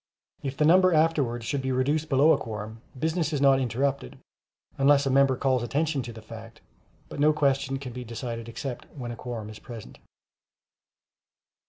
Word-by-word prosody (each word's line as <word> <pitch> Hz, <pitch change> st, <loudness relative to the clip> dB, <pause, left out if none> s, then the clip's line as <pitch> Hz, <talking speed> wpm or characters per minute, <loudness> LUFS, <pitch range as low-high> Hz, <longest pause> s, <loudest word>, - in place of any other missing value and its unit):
If 135 Hz, -1 st, -5 dB
the 150 Hz, -, +3 dB
number 185 Hz, +2 st, +5 dB
afterwards 145 Hz, -7 st, +1 dB
should 140 Hz, +3 st, -1 dB
be 130 Hz, 0 st, -2 dB
reduced 145 Hz, +5 st, 0 dB
below 140 Hz, +4 st, +5 dB
a -, -, +4 dB
quorum, 110 Hz, 0 st, -7 dB, 0.2 s
business 160 Hz, +3 st, -1 dB
is 145 Hz, -, 0 dB
not 135 Hz, -1 st, +5 dB
interrupted, 130 Hz, -, -2 dB, 0.6 s
unless 140 Hz, +1 st, +4 dB
a 135 Hz, -, +1 dB
member 135 Hz, 0 st, +4 dB
calls 130 Hz, -1 st, +1 dB
attention 145 Hz, +3 st, -1 dB
to 120 Hz, -1 st, -7 dB
the 110 Hz, -1 st, -11 dB
fact; 115 Hz, +1 st, -11 dB, 0.5 s
but -, -, -8 dB
no 150 Hz, +1 st, +5 dB
question 135 Hz, -2 st, +1 dB
can 130 Hz, -3 st, -8 dB
be 125 Hz, +1 st, -6 dB
decided 115 Hz, 0 st, -6 dB
except 125 Hz, +2 st, -6 dB
when 120 Hz, -3 st, -5 dB
a -, -, -6 dB
quorum 115 Hz, -3 st, -6 dB
is 110 Hz, -, -11 dB
present. 115 Hz, -4 st, -10 dB
135 Hz, 175 wpm, -26 LUFS, 120-145 Hz, 0.6 s, number